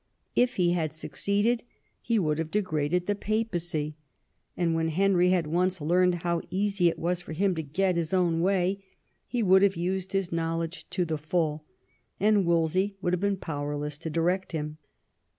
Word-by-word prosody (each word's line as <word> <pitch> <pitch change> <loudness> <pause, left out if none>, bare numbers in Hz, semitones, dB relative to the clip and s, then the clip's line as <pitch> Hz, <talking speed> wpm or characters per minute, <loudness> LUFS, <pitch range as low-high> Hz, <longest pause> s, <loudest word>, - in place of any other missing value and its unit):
If 245 0 +3
he 175 -2 +3
had 160 -3 -1
succeeded 205 +8 0 0.4
he 230 -1 +1
would 155 -6 +1
have 165 -1 -2
degraded 175 -3 0
the 205 - +1
Papacy; 175 -8 -2 0.6
and 170 -2 +1
when 165 0 +1
Henry 180 +2 +3
had 180 -3 +2
once 180 +4 0
learned 175 +2 +2
how 170 -1 0
easy 195 -1 +1
it 165 - +1
was 175 +1 -1
for 165 - -8
him 190 +4 +1
to 160 - -2
get 180 +5 0
his 165 -2 -1
own 175 -3 +2
way, 190 +1 +1 0.4
he 240 -2 -1
would 190 -1 +6
have 200 -1 +4
used 185 +2 -2
his 195 -2 0
knowledge 165 0 -3
to 180 - 0
the 155 -2 -2
full, 155 -1 -1 0.5
and 205 -2 +3
Wolsey 170 +4 +1
would 180 -2 -1
have 180 - +1
been 200 -1 +1
powerless 145 -3 -4
to 165 - -5
direct 175 +4 0
him. 150 -1 -4
175 Hz, 175 wpm, -28 LUFS, 160-190 Hz, 0.6 s, would